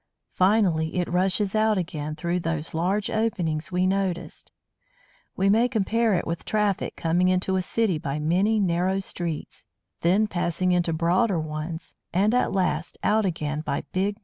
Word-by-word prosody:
Finally, 185 -5 +2
it 180 -1 0
rushes 190 +3 +1
out 215 -1 +2
again 155 -4 -3
through 170 +2 -1
those 165 -2 -3
large 190 +5 0
openings 180 -7 -1
we 180 +1 +1
noticed. 190 -2 -2 0.8
We 195 - +1
may 225 +5 +4
compare 225 -1 +1
it 175 - -1
with 170 0 -3
traffic 210 -2 0
coming 175 +2 +1
into 185 +1 +1
a 185 - +1
city 190 -3 0
by 140 -1 -3
many 185 +8 +2
narrow 185 0 +1
streets, 170 -4 -5 0.4
then 190 +6 +3
passing 180 -2 -1
into 175 -1 +1
broader 175 +4 +2
roads, 155 +2 -5 0.2
and 200 +5 +2
at 250 - +2
last 180 -4 -1
out 215 0 +3
again 155 -4 -2
by 140 - -2
big - - -21
main 190 +2 +2
roads. - - -29
180 Hz, 165 wpm, -25 LUFS, 165-200 Hz, 0.8 s, may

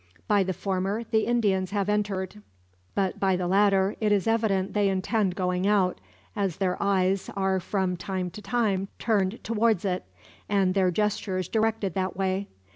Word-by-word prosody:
By 205 -1 +4
the 190 0 0
former 195 +4 -2
the 220 -1 0
Indians 200 -6 +1
have 200 -1 -1
entered; 210 -1 -1 0.5
but 190 -2 0
by 190 -1 +2
the 180 0 -2
latter 195 +1 +3
it 215 -1 +2
is 200 -2 +2
evident 215 -4 +1
they 205 -1 +2
intend 190 0 0
going 180 0 0
out, 195 -3 +2 0.3
as 195 -4 -1
their 185 -2 0
eyes 195 -1 +1
are 190 -1 +1
from 185 0 -1
time 185 0 -3
to 210 - -9
time 205 -5 0
turned 210 -2 0
towards 220 -3 +1
it, 185 -1 -1 0.5
and 195 -3 +2
their 190 -2 +3
gestures 190 -1 -1
directed 220 -4 0
that 185 -1 -2
way. 190 +1 -1
195 Hz, 165 wpm, -26 LUFS, 185-210 Hz, 0.5 s, By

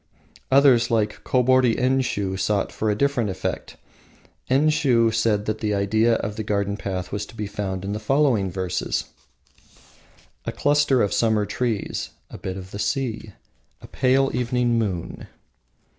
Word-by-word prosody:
Others, 130 -3 +5
like 110 -3 0
Kobori 130 -1 +3
Enshiu, 125 -7 0
sought 100 +1 0
for 110 - -2
a 105 - +1
different 125 -2 +1
effect. 95 0 -4 0.7
Enshiu 130 -5 +3
said 110 -2 +1
the 110 -1 -1
idea 110 +4 +2
of 105 0 -4
the 110 - -2
garden 100 -1 -1
path 95 -3 -4
was 105 0 -3
to - - -14
be 105 - -4
found 95 -2 -4
in 100 - -3
the 105 - -3
following 120 -4 +2
verses: 90 -1 -2 1.4
"A - - -2
cluster 145 -3 +2
of 100 - 0
summer 110 -2 +2
trees, 115 -2 -2 0.2
A - - -9
bit 95 0 -5
of 95 0 -9
the 100 - -7
sea, 110 -3 -2 0.5
A - - -13
pale 135 +1 +2
evening 125 -1 +1
moon." 95 -7 -4
110 Hz, 145 wpm, -23 LUFS, 100-125 Hz, 1.4 s, Others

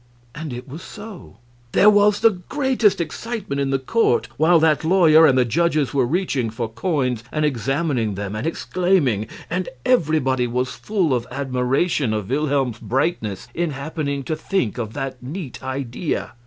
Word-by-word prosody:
And 150 0 -6
it 125 +2 -7
was 150 +6 -8
so! 210 -1 -11 0.4
There 205 - +5
was 205 0 +5
the 225 0 +6
greatest 220 - +1
excitement 170 -2 -3
in 135 - 0
the 135 - +2
court 135 - +1
while 165 +3 +4
that 155 -1 +3
lawyer 160 -2 +6
and 130 - +3
the 125 - +4
judges 155 +2 +1
were 130 -3 +2
reaching 145 -7 0
for 115 +1 -3
coins 125 - -1
and 155 0 0
examining 135 - -1
them 100 +1 -4
and 110 +9 -3
exclaiming. 165 - +1 0.2
And 180 +1 -2 0.2
everybody 145 - +2
was 125 +2 -2
full 190 -9 0
of 120 -1 -1
admiration 130 0 0
of 105 +1 -4
Wilhelm's 135 -5 0
brightness 120 - -2
in 170 0 -1
happening 140 0 -3
to 155 - -2
think 155 - -2
of 110 -2 -4
that 135 -2 -5
neat 145 +1 -7
idea. 130 +3 -3
145 Hz, 160 wpm, -21 LUFS, 125-175 Hz, 0.4 s, the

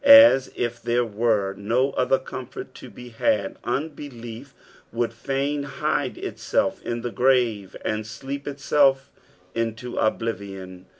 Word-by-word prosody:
As 280 - +9
if 120 0 -2
tliere 120 0 +1
were 105 -3 +1
no 120 +7 +1
other 130 +1 +2
comfort 130 0 -8
to 130 - -11
be 125 +3 -11
had, 110 -2 0
unbelief 120 -4 -5 0.4
would 115 0 -1
fain 135 +4 -1
hide 140 0 -1
itself - - -1
in 120 0 -3
the 120 0 -3
grave 120 -7 +2
and 110 0 -1
sleep 140 +5 -6
itself 140 -1 +2 0.4
into 115 +1 -3
oblivion. 100 -5 -2
120 Hz, 125 wpm, -24 LUFS, 110-135 Hz, 0.4 s, As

